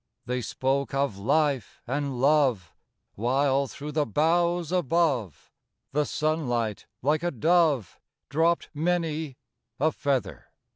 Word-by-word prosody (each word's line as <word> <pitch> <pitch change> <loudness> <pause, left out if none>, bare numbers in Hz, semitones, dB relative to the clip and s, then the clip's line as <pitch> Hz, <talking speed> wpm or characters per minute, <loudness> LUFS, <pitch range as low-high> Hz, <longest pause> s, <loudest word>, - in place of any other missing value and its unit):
They 125 0 -2
spoke 135 +3 -1
of 135 -8 0
life 140 +4 0
and 140 0 -2
love, 130 - +2 0.4
While, 135 +4 +1
through 145 +3 -7
the 150 0 0
boughs 170 - +1
above, 155 - 0 0.4
The 150 +1 +1
sunlight, 120 -9 -1 0.2
like 150 +3 +2
a 175 - 0
dove, 155 - +2 0.3
Dropped 165 +4 +1
many 160 -3 -1 0.4
a 155 +3 +3
feather. 140 -4 -2
145 Hz, 110 wpm, -27 LUFS, 130-160 Hz, 0.4 s, a